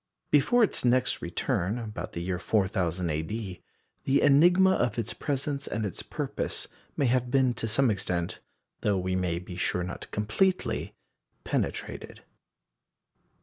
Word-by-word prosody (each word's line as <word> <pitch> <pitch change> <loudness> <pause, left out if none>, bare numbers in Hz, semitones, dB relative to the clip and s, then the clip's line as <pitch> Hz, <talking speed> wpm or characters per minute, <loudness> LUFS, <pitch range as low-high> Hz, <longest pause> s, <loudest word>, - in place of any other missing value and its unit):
Before 150 - +5
its 215 - 0
next 125 0 +2
return, 90 +4 -1
about 110 -3 -6
the 85 - -4
year 90 0 -2
4000 95 -4 0
A.D., 90 +5 -4 0.4
the 135 +1 +3
enigma 175 +7 +6
of 120 -10 +1
its 115 -1 -2
presence 140 0 -2
and 110 0 -2
its 95 - -4
purpose - - -3 0.3
may 140 - +2
have 125 0 +2
been 130 -1 +3
to 115 - -3
some 120 +2 +3
extent 90 -4 -2 0.4
though 100 -2 +1
we 95 0 -1
may 90 -2 0
be 90 0 -7
sure 90 0 0
not 90 - -6
completely 110 - 0 0.5
penetrated. - - -3
110 Hz, 140 wpm, -28 LUFS, 90-135 Hz, 0.5 s, enigma